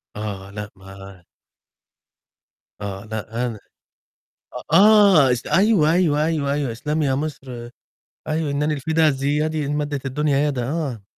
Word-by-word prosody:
آه، 100 -2 -6
لأ، 105 0 -7
ما 95 -1 -13 1.6
آه، 100 0 -6
لأ، 110 +2 -4
أنا 115 -4 -5 1.1
أ - - +4
آه، 200 -10 +6
اس 120 - -3
أيوه، 185 -2 +3
أيوه، 155 -4 +2
أيوه، 150 -4 -1
أيوه، 140 -4 -2
اسلمي 150 +6 -2
يا 135 - +1
مصر 130 -5 -6 0.6
أيوه، 155 -2 -1
"إنني 150 +2 0
الفدا، 155 +2 +1
ذي 140 +2 -1
يدي، 155 -1 -1
إن 145 - -2
مدت 145 -2 -3
الدنيا 145 +1 0
يدا." 125 -5 -2
آه. 140 -9 -3
140 Hz, 140 wpm, -21 LUFS, 115-155 Hz, 1.6 s, آه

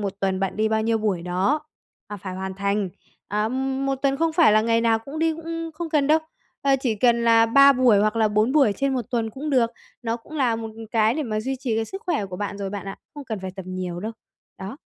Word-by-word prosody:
một 200 -2 -2
tuần 190 -1 0
bạn 195 0 -2
đi 220 0 +2
bao 220 0 +1
nhiêu 225 0 +1
buổi 200 -5 -1
đó 185 - 0 0.5
và 205 - -6
phải 185 -1 -7
hoàn 190 0 -5
thành. 200 0 -1 0.4
À, 210 +2 0
một 270 +1 -1
tuần 275 0 +2
không 330 +1 +1
phải 315 -9 +5
là 215 - +5
ngày 230 +1 +2
nào 230 -1 +3
cũng 275 +7 -8
đi, 325 0 +2
cũng 330 0 -5
không 335 0 -5
cần 290 -3 +2
đâu, 310 +1 +5 0.4
ờ, 275 -1 +4
chỉ 235 -5 0
cần 235 +2 +2
là 230 0 +5
3 275 +4 +7
buổi 250 -5 +4
hoặc 215 +2 +1
là 220 -1 +3
4 215 +5 +2
buổi 275 -9 +4
trên 275 -1 0
một 250 - -1
tuần 230 -3 -1
cũng 290 +6 -5
được. 240 -4 +3 0.3
Nó 230 0 -1
cũng 305 +7 -11
là 245 -5 +2
một 225 0 -5 0.2
cái 225 0 +3
để 310 - -1
mà 215 -4 -2
duy 265 +4 -3
trì 235 -5 -1
cái 225 - 0
sức 385 - -8
khỏe 215 - 0
của 185 -1 -7
bạn 205 0 -4
rồi 195 -1 -4
bạn 200 -1 -6
ạ, 195 - -6 0.2
không 290 -1 -8
cần 220 -5 -4
phải 190 0 -5
tập 190 - -6
nhiều 180 -1 -4
đâu. 220 +3 -4 0.5
Đó. 195 +7 -7
225 Hz, 260 wpm, -23 LUFS, 205-270 Hz, 0.5 s, 3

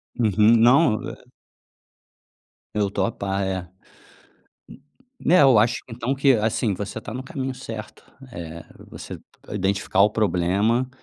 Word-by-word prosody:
Uhum. 110 0 +4
Não, 120 +1 +4
eh... - - -8 1.6
Eu 105 -2 +1
tô - - 0
a 115 - -1
par, 100 -1 -3
é. 95 -1 -2 1.6
N - - -5
né, 180 - +7
eu 130 -6 +6
acho 115 +3 +3
então 120 +3 -3
que, 135 0 +4
assim, 110 -1 0
você 105 +3 -6
tá 110 - -8
no 130 - -5
caminho 135 0 -5
certo, 115 -4 -9 0.3
eh, 85 -4 -8 0.2
você - - -9 0.3
identificar 100 -1 -1
o 105 - +4
problema, 105 +5 +1
110 Hz, 135 wpm, -23 LUFS, 100-125 Hz, 1.6 s, né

